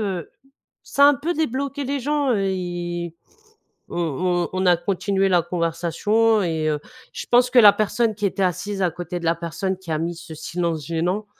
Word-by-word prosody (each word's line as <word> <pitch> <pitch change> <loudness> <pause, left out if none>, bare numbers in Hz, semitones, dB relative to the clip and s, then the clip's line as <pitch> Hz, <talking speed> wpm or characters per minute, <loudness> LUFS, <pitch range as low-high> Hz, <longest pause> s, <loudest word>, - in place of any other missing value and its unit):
heu, 190 -6 -3 0.5
ça 280 - +3
a - - +9
un 290 - +5
peu 315 +6 -2
débloqué 280 -2 -2
les 280 +1 -2
gens, 290 +1 0
heu, 220 - +1
et 175 -2 -3 0.7
on - - -7
on 175 +2 0
on 185 0 0
a 175 -1 +6
continué 195 +2 0
la 175 -2 +3
conversation 175 +6 +1
et 160 -3 -1
heu, 150 -1 0 0.3
je - - -6
pense 245 +1 +4
que 250 - +4
la 210 -3 +9
personne 215 +1 0
qui 210 0 -1
était 195 0 -2
assise 190 +2 -1
à 180 - +2
côté 175 +1 -6
de - - -9
la 165 - +3
personne 175 +3 -3
qui 180 -3 -10
a 155 - 0
mis 170 +2 -2
ce 165 -1 -10
silence 165 -1 -3
gênant, 175 +6 -1
185 Hz, 200 wpm, -22 LUFS, 170-215 Hz, 0.7 s, a